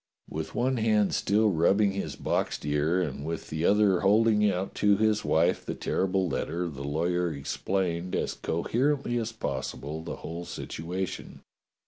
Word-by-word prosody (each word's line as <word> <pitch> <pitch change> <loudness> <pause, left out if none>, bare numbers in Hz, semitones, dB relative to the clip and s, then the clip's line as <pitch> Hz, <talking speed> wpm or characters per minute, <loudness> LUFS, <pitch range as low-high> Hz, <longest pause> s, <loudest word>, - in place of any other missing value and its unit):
With - - -5
one 130 +2 +1
hand 110 -2 +2
still 105 +1 +2
rubbing 95 +5 +3
his 100 0 -4
boxed - - -1
ear 75 +4 +1
and 70 -3 -4
with 80 +2 -5
the 80 +2 -1
other 100 -3 +4
holding 105 +1 +4
out 95 0 -2
to 105 -1 +5
his 110 0 +2
wife 80 +2 +2
the - - -4
terrible 95 0 0
letter, 85 +3 -2
the 70 -3 -7
lawyer 85 +4 0
explained 85 +4 -2
as - - -1
coherently 120 - 0
as 115 0 -3
possible 75 -4 -4
the 80 - -5
whole 85 +1 -7
situation. 90 +4 -5
90 Hz, 150 wpm, -28 LUFS, 80-105 Hz, -, to